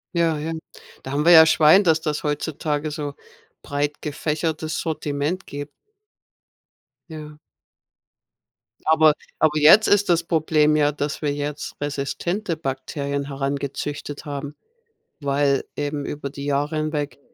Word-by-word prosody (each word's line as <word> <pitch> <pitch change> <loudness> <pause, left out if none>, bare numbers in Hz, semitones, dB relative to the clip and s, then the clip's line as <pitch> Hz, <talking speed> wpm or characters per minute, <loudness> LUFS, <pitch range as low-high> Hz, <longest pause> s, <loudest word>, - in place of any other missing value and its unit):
Ja, 165 -2 +2
ja, 155 +2 -4
ähm, 160 - -4 0.4
da 135 - -7
haben 145 +2 0
wir 175 - +7
ja 160 -1 +9
Schwein, 160 +4 +6
dass 160 -3 +3
das 150 -2 -2
heutzutage 150 0 -2
so 145 -2 -5 0.5
breit 145 +1 -2
gefächertes 155 +1 -2
Sortiment 155 +2 -3
gibt. 145 +1 -7 1.4
Ja. 150 -1 -9 1.5
Aber 155 -1 +5 0.3
aber 155 -1 +3
jetzt 165 +9 +7
ist 205 -1 +3
das 170 -1 +3
Problem 155 -2 +2
ja, 145 -1 +3
dass 145 0 -4
wir 145 -2 0
jetzt 145 +1 -5
resistente 160 +6 -2
Bakterien 140 0 -3
herangezüchtet 140 +1 -4
haben. 145 0 -6 0.7
Weil 140 -1 +1
eben 145 0 -3
über 145 -1 -5
die 140 0 -8
Jahre 145 +2 -1
hinweg, 150 -3 -3
150 Hz, 130 wpm, -22 LUFS, 145-160 Hz, 1.5 s, ja